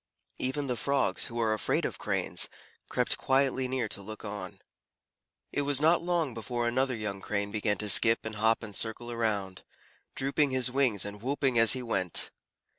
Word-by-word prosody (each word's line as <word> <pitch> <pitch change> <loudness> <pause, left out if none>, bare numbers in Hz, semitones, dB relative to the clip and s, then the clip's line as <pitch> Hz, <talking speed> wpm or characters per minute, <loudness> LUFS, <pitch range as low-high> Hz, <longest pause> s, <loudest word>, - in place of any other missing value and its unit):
Even 130 +3 -1
the 125 -2 -1
Frogs, 140 +2 0
who 120 -1 -5
are 110 -2 +2
afraid 110 - 0
of - - -4
Cranes, - - -1 0.4
crept - - 0
quietly 130 -1 +2
near 125 -3 -1
to 100 - -3
look 110 +2 -8
on. 100 -3 -6 0.9
It - - 0
was 140 -1 +1
not 160 +3 +4
long 170 -6 0
before 120 +1 -2
another 130 +2 +1
young 105 -3 -4
Crane 100 0 -2
began 105 -1 0
to 105 - -4
skip 115 +3 +5
and 110 -1 -5
hop 110 +2 +2
and 105 -3 -7
circle 120 +3 -1
around, 105 -5 -2 0.5
drooping 140 +2 +1
his 130 -1 +1
wings 125 -8 +1
and 100 0 -7
whooping 135 -1 +1
as 115 -1 +7
he 130 -1 -3
went. 95 -7 -1
115 Hz, 180 wpm, -29 LUFS, 105-130 Hz, 0.9 s, as